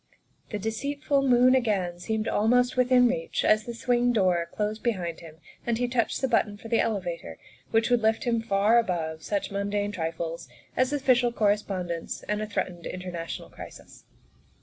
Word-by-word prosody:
' -, -, -42 dB
' -, -, -39 dB
The 210 Hz, -, -2 dB
deceitful 280 Hz, +7 st, -1 dB
moon 255 Hz, -1 st, +5 dB
again 200 Hz, -9 st, 0 dB
seemed 220 Hz, +4 st, -2 dB
almost 245 Hz, +4 st, +2 dB
within 250 Hz, 0 st, +5 dB
reach 245 Hz, 0 st, -1 dB
as 215 Hz, 0 st, +3 dB
the 235 Hz, -, -5 dB
swing 245 Hz, +1 st, +2 dB
door 180 Hz, -6 st, +1 dB
closed 215 Hz, 0 st, -2 dB
behind 180 Hz, -9 st, -2 dB
them 160 Hz, -2 st, -12 dB, 0.3 s
and 235 Hz, -1 st, 0 dB
he 245 Hz, +1 st, 0 dB
touched 240 Hz, -2 st, 0 dB
the 265 Hz, -, +2 dB
button 215 Hz, -4 st, +1 dB
for 225 Hz, +2 st, -10 dB
the 230 Hz, -, +2 dB
elevator 175 Hz, -, -2 dB, 0.3 s
which 225 Hz, +1 st, +2 dB
would 245 Hz, -1 st, +4 dB
lift 220 Hz, 0 st, +2 dB
him 235 Hz, -2 st, +1 dB
far 215 Hz, +1 st, +3 dB
above 165 Hz, -7 st, -2 dB
such 205 Hz, +2 st, -2 dB
mundane 205 Hz, +1 st, -1 dB
trifles 165 Hz, -4 st, -4 dB, 0.3 s
as 255 Hz, +1 st, +2 dB
official 255 Hz, -4 st, +3 dB
correspondence 195 Hz, -6 st, -1 dB
and 210 Hz, 0 st, -2 dB
a 215 Hz, -, -3 dB
threatened 180 Hz, -4 st, -3 dB
international 180 Hz, -2 st, -6 dB
crisis. -, -, -12 dB
215 Hz, 170 wpm, -27 LUFS, 185-245 Hz, 0.3 s, moon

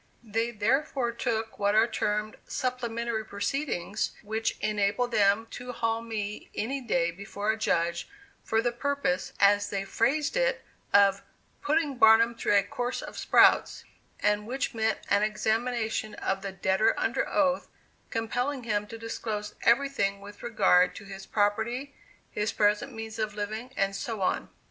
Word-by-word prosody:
They 225 Hz, +1 st, -1 dB
therefore 240 Hz, +3 st, 0 dB
took 225 Hz, -1 st, -3 dB
what 205 Hz, 0 st, +2 dB
are 220 Hz, +1 st, +6 dB
termed 210 Hz, -2 st, -2 dB
"supplementary 235 Hz, -3 st, -2 dB
proceedings," 210 Hz, -, -2 dB
which 220 Hz, +2 st, -2 dB
enabled 210 Hz, +4 st, 0 dB
them 205 Hz, +1 st, +3 dB
to 250 Hz, 0 st, -6 dB
haul 225 Hz, -1 st, -1 dB
me 210 Hz, -3 st, -5 dB
any 270 Hz, +5 st, -2 dB
day 175 Hz, -8 st, +1 dB
before 200 Hz, +3 st, -3 dB
a -, -, -2 dB
judge 170 Hz, -, 0 dB, 0.3 s
for 225 Hz, 0 st, +1 dB
the 240 Hz, -, +1 dB
purpose, 260 Hz, -7 st, -1 dB
as 205 Hz, 0 st, +4 dB
they 195 Hz, -1 st, -2 dB
phrased 280 Hz, -, +1 dB
it, -, -, +1 dB, 0.3 s
of 200 Hz, -1 st, +5 dB, 0.4 s
"putting 295 Hz, -2 st, +1 dB
Barnum 225 Hz, +1 st, +6 dB
through 230 Hz, -2 st, +1 dB
a 200 Hz, -, +4 dB
course 245 Hz, +1 st, -3 dB
of -, -, -8 dB
sprouts," -, -, +4 dB, 0.4 s
and 210 Hz, 0 st, +1 dB
which 260 Hz, +2 st, -2 dB
meant 220 Hz, -1 st, +1 dB
an 200 Hz, -, +4 dB
examination 220 Hz, +1 st, -1 dB
of 195 Hz, 0 st, -2 dB
the 195 Hz, -, -4 dB
debtor 190 Hz, +2 st, +1 dB
under -, -, 0 dB
oath, 280 Hz, -2 st, +1 dB, 0.4 s
compelling 245 Hz, +4 st, -2 dB
him 210 Hz, -2 st, -1 dB
to 225 Hz, -, -8 dB
disclose 220 Hz, -2 st, -4 dB
everything 235 Hz, -6 st, +2 dB
with 205 Hz, +1 st, -12 dB
regard 185 Hz, -5 st, +3 dB
to -, -, -9 dB
his 195 Hz, -1 st, -9 dB
property, 225 Hz, +7 st, 0 dB, 0.4 s
his 210 Hz, 0 st, -1 dB
present 210 Hz, +5 st, +1 dB
means 225 Hz, -1 st, -7 dB
of 215 Hz, -1 st, -2 dB
living, 215 Hz, +4 st, -4 dB
and 195 Hz, 0 st, +1 dB
so 220 Hz, -1 st, -3 dB
on. -, -, 0 dB
220 Hz, 150 wpm, -28 LUFS, 205-240 Hz, 0.4 s, are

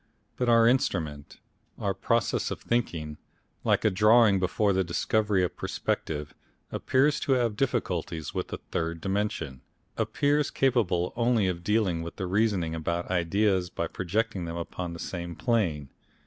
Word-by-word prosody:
But 125 Hz, -1 st, 0 dB
our 115 Hz, -1 st, +6 dB
Instrument, 80 Hz, -, 0 dB, 0.4 s
our -, -, -1 dB
process -, -, 0 dB
of -, -, -4 dB
thinking, 80 Hz, -11 st, -2 dB, 0.4 s
like -, -, +2 dB
a 110 Hz, -, +5 dB
drawing 105 Hz, +1 st, +5 dB
before 100 Hz, +2 st, +1 dB
the 95 Hz, 0 st, +2 dB
discovery 100 Hz, +3 st, +1 dB
of 90 Hz, -, -2 dB
perspective, 75 Hz, -2 st, -3 dB, 0.4 s
appears 140 Hz, +3 st, +2 dB
to 140 Hz, -, +1 dB
have 120 Hz, -4 st, +1 dB
difficulties 90 Hz, -, -2 dB
with -, -, -2 dB
the -, -, -5 dB
third 80 Hz, 0 st, -2 dB
dimension, 95 Hz, -9 st, -2 dB, 0.4 s
appears 145 Hz, 0 st, +1 dB
capable 110 Hz, -10 st, +1 dB
only 120 Hz, -3 st, +2 dB
of 90 Hz, -2 st, -2 dB
dealing 100 Hz, -5 st, +1 dB
with 85 Hz, +4 st, -8 dB
or 95 Hz, -, -2 dB
reasoning 95 Hz, -4 st, +1 dB
about 85 Hz, +2 st, -2 dB
ideas 95 Hz, +1 st, +1 dB
by 85 Hz, -, -3 dB
projecting 95 Hz, +3 st, -2 dB
them 85 Hz, 0 st, -5 dB
upon 85 Hz, +1 st, -5 dB
the 85 Hz, -, -8 dB
same 85 Hz, -1 st, -5 dB
plane. 85 Hz, -, 0 dB
95 Hz, 150 wpm, -28 LUFS, 85-115 Hz, 0.4 s, our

